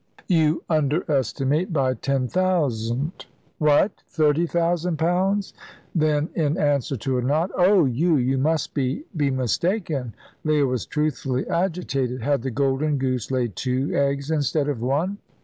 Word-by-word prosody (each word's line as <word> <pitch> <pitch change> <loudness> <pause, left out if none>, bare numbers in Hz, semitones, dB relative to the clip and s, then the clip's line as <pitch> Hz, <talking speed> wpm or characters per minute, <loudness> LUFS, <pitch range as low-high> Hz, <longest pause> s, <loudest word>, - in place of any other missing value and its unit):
"You 160 -3 +2
underestimate 150 - 0
by 135 -5 +1
ten 135 0 -1
thousand." 145 -6 -1 0.3
"What! 150 +6 +4 0.2
Thirty 155 +2 +2
thousand 170 0 0
pounds?" 190 +5 0 0.4
Then, 155 -1 +1
in 155 0 0
answer 140 -5 +1
to 130 +2 -1
a - - 0
nod, 155 +8 0
"Oh, 185 -1 +5
you 155 +7 +2
you 130 0 +1
must 155 +2 0
be 135 - -1
be 145 -3 +1
mistaken." 135 - -1 0.3
Leah 150 -2 +2
was 125 -3 -2
truthfully 140 -4 -1
agitated. 140 -9 -1
Had 140 -1 +1
the 135 - -3
golden 140 +3 0
goose 130 -3 -1
laid 125 -6 -1
two 130 +5 -1
eggs 140 +1 0
instead 150 -1 +1
of 140 -6 -2
one? 155 - -1
145 Hz, 140 wpm, -23 LUFS, 130-165 Hz, 0.4 s, Oh